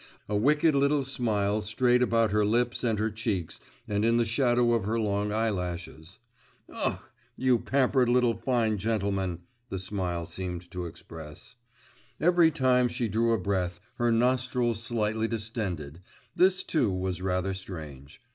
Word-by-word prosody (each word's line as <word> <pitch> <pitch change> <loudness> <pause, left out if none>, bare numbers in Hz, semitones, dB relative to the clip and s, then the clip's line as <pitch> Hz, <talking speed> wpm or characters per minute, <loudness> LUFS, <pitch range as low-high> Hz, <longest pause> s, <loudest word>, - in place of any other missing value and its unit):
A 105 - -2
wicked 150 +8 +3
little 140 +1 +2
smile 110 -5 0
strayed 120 +4 +2
about 115 -3 +2
her 105 0 +2
lips 120 +4 +1
and 115 -3 +1
her 110 +1 0
cheeks 105 -6 -3 0.3
and 105 0 0
in 115 +1 +3
the 120 - +2
shadow 120 0 +2
of 115 -4 0
her 115 +2 0
long 105 -1 0
eyelashes. 90 -6 -3 0.6
'Ugh, - - -1 0.4
you 130 -2 +3
pampered 130 -1 +2
little 120 -1 +3
fine 115 -5 0
gentleman!' 100 -4 -1 0.3
this 95 -1 -4
smile 90 -4 -3
seemed 90 0 -6
to 90 -1 -4
express. 80 - -11 0.7
Every 170 0 +5
time 130 -4 +3
she 120 -1 -2
drew 115 +2 +1
a - - +2
breath, 90 -2 -2 0.2
her 120 0 +2
nostrils 125 -1 +1
slightly 110 -1 0
distended 100 - -4 0.3
this, 185 +1 +3
too, 130 -11 +1
was 90 -1 -3
rather 95 +1 -1
strange. 75 -8 -9
110 Hz, 145 wpm, -28 LUFS, 95-120 Hz, 0.7 s, Every